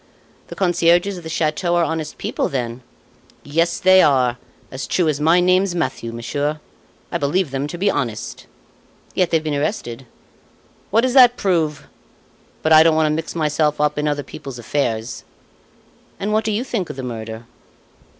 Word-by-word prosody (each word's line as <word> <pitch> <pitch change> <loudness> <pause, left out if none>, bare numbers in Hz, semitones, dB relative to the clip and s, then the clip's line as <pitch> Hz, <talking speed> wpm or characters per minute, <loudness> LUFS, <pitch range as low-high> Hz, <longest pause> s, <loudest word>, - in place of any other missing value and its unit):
"The - - -9
concierges 175 +1 +2
of - - -8
the 160 - -7
chateau 160 +2 0
are 175 - +3
honest 160 -2 -3
people, - - -2
then?" 120 -2 -3 0.6
"Yes, 165 +4 0
they 185 0 +6
are, 130 -5 +3 0.3
as 130 +1 -5
true 175 -3 +1
as 150 -1 -1
my 165 +3 +4
name's 185 +1 +2
Mathieu, 135 -8 -2
monsieur. 145 +6 -3 0.5
I - - -1
believe 145 +2 0
them 135 +1 -2
to 175 - -6
be 200 +3 +2
honest." 115 -7 -4 0.7
"Yet 180 -2 +1
they've 165 -2 +1
been 155 -1 -2
arrested?" 135 - -3 0.8
"What 225 +3 +3
does 255 0 0
that 245 -2 +7
prove? 160 -7 0 0.8
But 160 - +4
I 155 - +9
don't 160 0 +4
want 160 0 +3
to - - 0
mix 160 +1 -5
myself 150 -1 0
up 150 0 +1
in 150 - 0
other 145 -1 -1
people's 135 -2 -9
affairs." 120 -2 -2 1.0
"And 210 +2 -2
what 215 0 +1
do 220 - 0
you 215 +4 -1
think 225 -9 -3
of - - -6
the 130 - -6
murder?" 115 -1 -6
155 Hz, 175 wpm, -20 LUFS, 140-180 Hz, 1.0 s, I